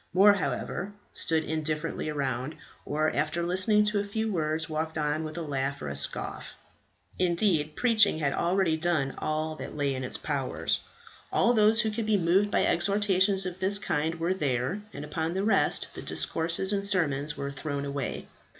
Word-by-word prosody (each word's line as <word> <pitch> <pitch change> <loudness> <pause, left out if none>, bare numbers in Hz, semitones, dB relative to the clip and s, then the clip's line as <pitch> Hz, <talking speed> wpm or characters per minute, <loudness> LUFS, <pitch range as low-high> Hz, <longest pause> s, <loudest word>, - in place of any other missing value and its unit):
More, 200 +2 +7
however, 180 +3 -3 0.2
stood 160 -1 +2
indifferently 155 0 -2
round, 135 0 -2 0.3
or 155 +2 0
after 155 +4 -1
listening 185 +4 +3
to 210 0 +1
a - - 0
few 220 +2 -2
words 160 -2 -1
walked 160 0 -3
on 150 +1 0
with 155 +1 -6
a 170 - -2
laugh 140 -1 -2
or 70 - -5
a 70 - -4
scoff; 70 - -2 0.6
indeed 170 -4 +2
preaching 225 -7 +4
had 145 -3 0
already 175 -2 +1
done 155 -5 0
all 155 +1 -1
that - - -7
lay 140 -2 +1
in 130 0 -4
its 125 - -1
power. - - -3 0.7
All 240 - +3
those 220 0 +5
who 220 -2 0
could 215 0 -3
be 215 -1 +3
moved 185 +3 +3
by - - +2
exhortations 195 0 +2
of 185 0 -5
this 195 +2 +1
kind 160 -4 -1
were 170 +2 0
there, 145 +2 -1
and 145 - -7
upon 160 +3 -3
the 190 - 0
rest 220 - +2
the - - -7
discourses 170 +4 -1
and 200 0 -1
sermons 150 -6 0
were 140 0 -3
thrown 140 0 -4
away. 140 -2 -4
165 Hz, 175 wpm, -28 LUFS, 150-195 Hz, 0.7 s, More